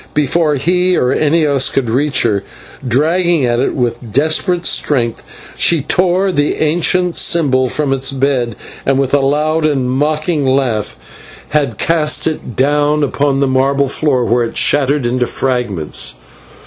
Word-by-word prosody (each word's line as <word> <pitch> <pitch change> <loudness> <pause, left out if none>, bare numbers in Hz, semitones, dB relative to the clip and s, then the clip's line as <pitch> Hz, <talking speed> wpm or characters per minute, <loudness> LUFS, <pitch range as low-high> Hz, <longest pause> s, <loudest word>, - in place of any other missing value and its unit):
Before 150 +1 +1
he 180 +5 +1
or 125 - +1
any 155 +3 +1
of 145 -2 +1
us 130 - +3
could 135 -3 -1
reach 135 +5 0
her, 100 -4 0 0.4
dragging 160 +4 +1
at 120 0 0
it 130 - -1
with 120 -2 -3
desperate 160 - 0
strength, 120 -6 0 0.3
she 165 -5 +1
tore 185 +3 +1
the 145 -4 0
ancient 175 +3 0
symbol 130 -6 +2
from 145 -1 -1
its 135 0 -1
bed, 130 -4 -1 0.3
and 135 0 +1
with 135 -1 -1
a 145 - +4
loud 150 +3 0
and 135 -5 0
mocking 150 +3 0
laugh 130 -5 -1 0.5
had 140 -8 -1
cast 155 -2 +1
it 155 -7 -3
down 145 +2 +1
upon 140 0 0
the - - +3
marble 135 +1 +1
floor, 135 -4 0
where 120 +1 +1
it 115 - -5
shattered 145 -1 +2
into 125 +1 0
fragments. 120 - -1
140 Hz, 155 wpm, -14 LUFS, 130-155 Hz, 0.5 s, a